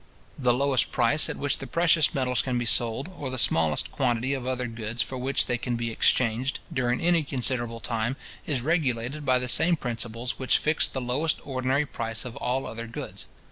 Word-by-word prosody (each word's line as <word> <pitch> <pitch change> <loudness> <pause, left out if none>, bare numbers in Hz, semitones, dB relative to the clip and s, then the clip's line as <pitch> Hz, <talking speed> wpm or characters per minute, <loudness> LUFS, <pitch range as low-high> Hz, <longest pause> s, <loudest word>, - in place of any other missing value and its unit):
The 125 -3 +3
lowest 135 +1 +2
price 130 +5 +3
at - - -4
which 145 0 +1
the 135 - -6
precious 165 0 +3
metals 125 -2 +1
can 125 -2 -2
be 120 - -2
sold, 120 +4 +2
or 140 - -3
the 130 - -4
smallest 80 - +2
quantity 125 +1 0
of 130 -2 -4
other 130 -1 -2
goods 115 -1 -3
for 130 - -7
which 130 +2 +1
they 120 - -2
can 120 0 -2
be 115 0 -3
exchanged, 120 +3 +1 0.2
during 125 -1 0
any 170 -1 +3
considerable 125 -4 0
time, 115 +4 -2 0.3
is 135 -6 0
regulated 145 -3 -1
by 130 -1 +4
the 125 0 -2
same 170 +7 +5
principles 120 -2 -3
which 130 - +3
fix 155 +1 +2
the 130 - -5
lowest 130 +6 0
ordinary 130 +1 0
price 115 -4 -3
of 120 - -7
all 130 +2 -2
other 115 +1 -6
goods. 115 - -7
125 Hz, 195 wpm, -26 LUFS, 120-135 Hz, 0.3 s, same